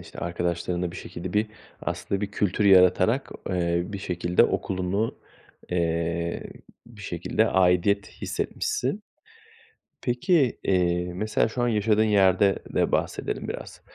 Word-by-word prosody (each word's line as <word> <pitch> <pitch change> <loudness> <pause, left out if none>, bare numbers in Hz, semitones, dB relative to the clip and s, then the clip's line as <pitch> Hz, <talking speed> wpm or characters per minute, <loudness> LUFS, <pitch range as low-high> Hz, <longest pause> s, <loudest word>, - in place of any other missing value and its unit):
işte, - - -13
arkadaşlarınla 85 0 -2
bir 95 - -9
şekilde 90 -1 -7
bir, 105 +1 +2 0.4
aslında 100 0 -2
bir 100 -1 -3
kültür 105 0 0
yaratarak, 95 +6 +5 0.2
eee, 85 -1 +1
bir 100 0 -6
şekilde 90 -1 +1
okulunu, 95 +4 -1 0.6
eee, 85 0 -1 0.4
bir 115 -3 -14
şekilde 90 +5 0
aidiyet 95 +2 +3
hissetmişsin. 420 - -3 1.0
Peki, 130 +2 +1
eee, 90 -1 +1
mesela 110 +4 0
şu 120 +3 -4
an - - +2
yaşadığın 110 -1 +2
yerde 100 -2 +4 0.2
de - - +1
bahsedelim - - -2
biraz. - - -7
95 Hz, 120 wpm, -25 LUFS, 90-105 Hz, 1.0 s, yaratarak